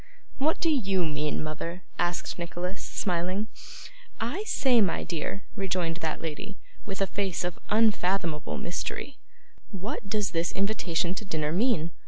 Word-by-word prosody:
'What 305 Hz, +4 st, +3 dB
do 330 Hz, -, +4 dB
YOU 195 Hz, -, +3 dB
mean, 150 Hz, 0 st, 0 dB
mother?' 170 Hz, +4 st, -4 dB, 0.2 s
asked 175 Hz, +1 st, 0 dB
Nicholas, 180 Hz, +2 st, -3 dB
smiling. 185 Hz, +3 st, 0 dB, 0.7 s
'I 280 Hz, -, -1 dB
say, 260 Hz, -, +5 dB
my 190 Hz, -5 st, +2 dB
dear,' 175 Hz, +4 st, -2 dB
rejoined 180 Hz, -5 st, 0 dB
that 160 Hz, -3 st, -2 dB
lady, 180 Hz, +6 st, -4 dB, 0.3 s
with 195 Hz, -1 st, -3 dB
a -, -, +5 dB
face 195 Hz, -2 st, -1 dB
of 175 Hz, -1 st, -2 dB
unfathomable 195 Hz, -7 st, +3 dB
mystery, 220 Hz, +9 st, -3 dB, 0.5 s
'what 200 Hz, +1 st, -4 dB
does 210 Hz, -1 st, +1 dB
this 165 Hz, 0 st, +1 dB
invitation 190 Hz, -4 st, +1 dB
to 200 Hz, -, -4 dB
dinner 155 Hz, -6 st, 0 dB
mean? 175 Hz, -4 st, +3 dB
185 Hz, 140 wpm, -29 LUFS, 170-210 Hz, 0.7 s, say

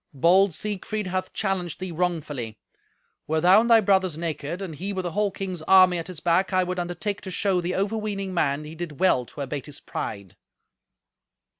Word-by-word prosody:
Bold 185 Hz, +7 st, +5 dB
Siegfried 210 Hz, +4 st, -3 dB
hath 185 Hz, 0 st, -3 dB
challenged 185 Hz, -5 st, -2 dB
thee 185 Hz, -1 st, -5 dB
wrongfully. 155 Hz, -10 st, -2 dB, 0.7 s
Were 160 Hz, +1 st, +1 dB
thou 180 Hz, +6 st, +6 dB
and 235 Hz, -, -1 dB
thy 230 Hz, -1 st, +7 dB
brothers 190 Hz, -5 st, +2 dB
naked, 165 Hz, 0 st, -3 dB
and 190 Hz, -5 st, -5 dB
he 185 Hz, +7 st, -4 dB
with 185 Hz, -1 st, -3 dB
a 175 Hz, -, -2 dB
whole 210 Hz, +3 st, +1 dB
king's 190 Hz, -3 st, -5 dB
army 185 Hz, -2 st, +6 dB
at 165 Hz, -, -6 dB
his 180 Hz, -4 st, -7 dB
back, 175 Hz, +4 st, +2 dB
I 185 Hz, -1 st, +3 dB
would 180 Hz, 0 st, -3 dB
undertake 175 Hz, +4 st, -3 dB
to 190 Hz, -, -7 dB
show 185 Hz, 0 st, +1 dB
the 175 Hz, +1 st, -2 dB
overweening 200 Hz, -1 st, -2 dB
man 150 Hz, -4 st, 0 dB
he 150 Hz, +1 st, -9 dB
did 165 Hz, -3 st, -7 dB
well 155 Hz, -10 st, +3 dB
to 145 Hz, -, -9 dB
abate 140 Hz, 0 st, -4 dB
his 145 Hz, -, -7 dB
pride." 100 Hz, -4 st, -6 dB
180 Hz, 190 wpm, -25 LUFS, 160-195 Hz, 0.7 s, thy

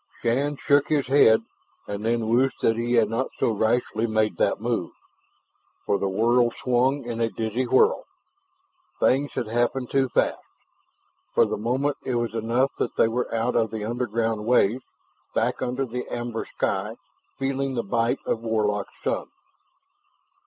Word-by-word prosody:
Shann 140 Hz, +5 st, 0 dB
shook 145 Hz, +1 st, +3 dB
his 145 Hz, -3 st, +2 dB
head, 115 Hz, -5 st, +5 dB, 0.4 s
and 100 Hz, +1 st, -5 dB
then 115 Hz, 0 st, 0 dB
wished 125 Hz, +4 st, +1 dB
that 115 Hz, -, +3 dB
he 120 Hz, +1 st, -1 dB
had 115 Hz, -3 st, +4 dB
not 115 Hz, +5 st, -2 dB
so -, -, +1 dB
rashly 110 Hz, +1 st, 0 dB
made 110 Hz, -4 st, 0 dB
that -, -, +1 dB
move, -, -, -1 dB, 1.0 s
for 100 Hz, -, +1 dB
the 100 Hz, -, 0 dB
world 120 Hz, +4 st, +2 dB
swung 130 Hz, +3 st, +1 dB
in 120 Hz, -1 st, -4 dB
a 115 Hz, -, +2 dB
dizzy 115 Hz, +3 st, -2 dB
whirl. 455 Hz, -, +3 dB, 0.9 s
Things 140 Hz, +2 st, +2 dB
had -, -, -2 dB
happened 120 Hz, +3 st, -1 dB
too 135 Hz, -1 st, +2 dB
fast. -, -, +1 dB, 0.9 s
For -, -, +5 dB
the -, -, -2 dB
moment 130 Hz, +6 st, -1 dB
it 130 Hz, -, -2 dB
was 120 Hz, -2 st, -1 dB
enough 115 Hz, +4 st, +1 dB
that -, -, -2 dB
they -, -, +4 dB
were 120 Hz, +2 st, -2 dB
out 115 Hz, +2 st, 0 dB
of 110 Hz, -2 st, +2 dB
the 110 Hz, -1 st, -4 dB
underground 115 Hz, -2 st, -1 dB
ways, 125 Hz, 0 st, +3 dB, 0.5 s
back -, -, 0 dB
under 130 Hz, +2 st, -1 dB
the 125 Hz, 0 st, -5 dB
amber 120 Hz, -1 st, -4 dB
sky, 100 Hz, +3 st, -2 dB, 0.4 s
feeling 135 Hz, 0 st, -1 dB
the 120 Hz, -, -1 dB
bite 115 Hz, +3 st, 0 dB
of -, -, 0 dB
Warlock's 105 Hz, -3 st, -1 dB
sun. -, -, -1 dB
120 Hz, 160 wpm, -25 LUFS, 110-130 Hz, 1.0 s, head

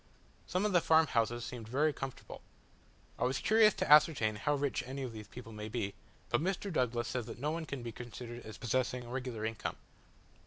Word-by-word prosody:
Some 185 Hz, +3 st, 0 dB
of 210 Hz, -, +2 dB
the 175 Hz, -, +5 dB
farm 160 Hz, 0 st, +5 dB
houses 120 Hz, -2 st, 0 dB
seemed 120 Hz, -3 st, -7 dB
very 145 Hz, +6 st, +2 dB
comfortable. 135 Hz, -3 st, -7 dB, 0.8 s
I -, -, +1 dB
was 130 Hz, +1 st, +1 dB
curious 215 Hz, +3 st, +5 dB
to -, -, -1 dB
ascertain 150 Hz, -8 st, +6 dB
how 145 Hz, +7 st, +1 dB
rich 140 Hz, -2 st, 0 dB
any 135 Hz, +1 st, -4 dB
of 125 Hz, -3 st, -5 dB
these 105 Hz, -2 st, -8 dB
people 120 Hz, 0 st, -10 dB
might 105 Hz, 0 st, -6 dB
be, 100 Hz, -5 st, -1 dB, 0.4 s
but -, -, +2 dB
Mr. 190 Hz, +2 st, -1 dB
Douglas 120 Hz, -4 st, +1 dB
says 125 Hz, -3 st, -3 dB
that -, -, -7 dB
no 145 Hz, +5 st, -1 dB
one 165 Hz, 0 st, -3 dB
can 140 Hz, -4 st, -5 dB
be 120 Hz, -, -4 dB
considered 120 Hz, +1 st, -8 dB
as 110 Hz, -, -9 dB
possessing 125 Hz, 0 st, 0 dB
a -, -, -10 dB
regular 125 Hz, -4 st, -3 dB
income. 110 Hz, 0 st, -3 dB
125 Hz, 205 wpm, -33 LUFS, 115-150 Hz, 0.8 s, ascertain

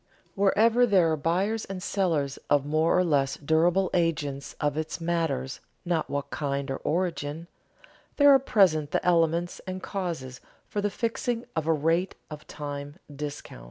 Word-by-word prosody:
Wherever 225 Hz, +5 st, +4 dB
there 185 Hz, -6 st, +4 dB
are -, -, +2 dB
buyers 185 Hz, +8 st, 0 dB
and 190 Hz, -2 st, -6 dB
sellers 160 Hz, -8 st, 0 dB
of 145 Hz, -1 st, +3 dB
more 155 Hz, +3 st, +2 dB
or 180 Hz, -, +4 dB
less 140 Hz, -5 st, +1 dB
durable 170 Hz, +5 st, +2 dB
agents 150 Hz, -5 st, -1 dB
of 145 Hz, -1 st, 0 dB
it 155 Hz, +2 st, -3 dB
matters 165 Hz, -6 st, -1 dB, 0.3 s
not 170 Hz, -3 st, -1 dB
what 140 Hz, 0 st, -3 dB
kind 140 Hz, -2 st, -2 dB
or 135 Hz, -, -2 dB
origin, 165 Hz, -2 st, -2 dB, 0.7 s
there 285 Hz, -1 st, +7 dB
are 270 Hz, -, +7 dB
present 180 Hz, -, +3 dB
the -, -, -1 dB
elements 170 Hz, 0 st, +2 dB
and 185 Hz, 0 st, -5 dB
causes 165 Hz, -10 st, -4 dB, 0.3 s
for 205 Hz, -, -2 dB
the 205 Hz, -, 0 dB
fixing 230 Hz, +2 st, -2 dB
of 160 Hz, -1 st, -1 dB
a -, -, +4 dB
rate 165 Hz, +5 st, 0 dB, 0.2 s
of 150 Hz, 0 st, -9 dB
time 145 Hz, -1 st, -6 dB, 0.2 s
discount. 145 Hz, -, -7 dB
165 Hz, 160 wpm, -27 LUFS, 145-185 Hz, 0.7 s, there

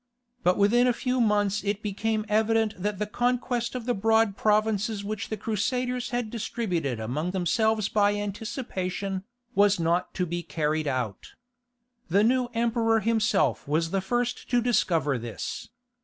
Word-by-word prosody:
But 180 Hz, +1 st, +3 dB
within 235 Hz, +5 st, +4 dB
a 250 Hz, -, +3 dB
few 255 Hz, -1 st, 0 dB
months 210 Hz, -2 st, +2 dB
it 205 Hz, +1 st, -2 dB
became 215 Hz, +1 st, -1 dB
evident 220 Hz, 0 st, +2 dB
that 200 Hz, +2 st, -2 dB
the 210 Hz, -, -1 dB
conquest 245 Hz, +2 st, -1 dB
of 245 Hz, -3 st, -4 dB
the 245 Hz, -, +1 dB
broad 225 Hz, -1 st, +2 dB
provinces 215 Hz, 0 st, +1 dB
which 215 Hz, +1 st, -4 dB
the 215 Hz, -, -3 dB
Crusaders 245 Hz, +4 st, -1 dB
had 240 Hz, -3 st, -2 dB
distributed 180 Hz, -, -2 dB
among 135 Hz, +10 st, -2 dB
themselves 215 Hz, +4 st, +1 dB
by 205 Hz, -1 st, +2 dB
anticipation, 200 Hz, -2 st, -4 dB, 0.3 s
was 205 Hz, -2 st, +4 dB
not 170 Hz, +2 st, 0 dB
to 180 Hz, -, 0 dB
be 175 Hz, +1 st, -3 dB
carried 155 Hz, -2 st, -1 dB
out. 125 Hz, -7 st, -3 dB, 0.8 s
The 200 Hz, +5 st, +4 dB
new 250 Hz, +2 st, +2 dB
emperor 230 Hz, -1 st, +2 dB
himself 215 Hz, -6 st, +1 dB
was 165 Hz, +3 st, 0 dB
the 195 Hz, -, +1 dB
first 240 Hz, +5 st, -2 dB
to 245 Hz, -, +3 dB
discover 165 Hz, -, +1 dB
this. 115 Hz, -1 st, -6 dB
210 Hz, 150 wpm, -27 LUFS, 185-230 Hz, 0.8 s, within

